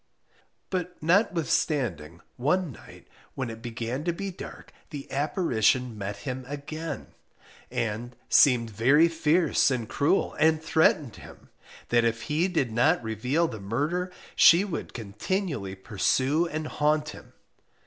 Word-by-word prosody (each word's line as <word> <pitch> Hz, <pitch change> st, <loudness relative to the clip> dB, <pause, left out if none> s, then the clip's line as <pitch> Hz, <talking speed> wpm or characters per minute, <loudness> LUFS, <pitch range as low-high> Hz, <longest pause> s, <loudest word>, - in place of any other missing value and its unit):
But 180 Hz, -1 st, -3 dB
notwithstanding, 155 Hz, -, +1 dB
one 155 Hz, +6 st, 0 dB
night -, -, -15 dB, 0.3 s
when 130 Hz, -4 st, -3 dB
it 110 Hz, 0 st, -10 dB
began 120 Hz, +3 st, -4 dB
to 175 Hz, -, +2 dB
be 195 Hz, +3 st, -5 dB
dark, 175 Hz, -, -10 dB, 0.2 s
the 145 Hz, -3 st, -7 dB
apparition 125 Hz, -, +1 dB
met 100 Hz, -1 st, -5 dB
him 130 Hz, +3 st, -5 dB
again, 150 Hz, +2 st, -6 dB, 0.6 s
and 115 Hz, +2 st, -3 dB
seemed 120 Hz, -5 st, +4 dB
very 135 Hz, +10 st, +4 dB
fierce 165 Hz, -1 st, +2 dB
and 125 Hz, -4 st, -2 dB
cruel, 145 Hz, -, +1 dB
and 160 Hz, 0 st, +4 dB
threatened 155 Hz, -5 st, +2 dB
him, -, -, -14 dB, 0.4 s
that 120 Hz, 0 st, +3 dB
if 115 Hz, -1 st, 0 dB
he 160 Hz, +5 st, +1 dB
did 160 Hz, -10 st, -1 dB
not 135 Hz, +8 st, +2 dB
reveal 125 Hz, -, 0 dB
the 110 Hz, -8 st, -7 dB
murder, 150 Hz, -, -2 dB, 0.2 s
she 175 Hz, +4 st, +7 dB
would 185 Hz, -5 st, -6 dB
continually 115 Hz, -, -3 dB
pursue 130 Hz, -, +1 dB
and 155 Hz, -1 st, -4 dB
haunt 150 Hz, 0 st, 0 dB
him. -, -, -12 dB
145 Hz, 130 wpm, -27 LUFS, 115-165 Hz, 0.6 s, she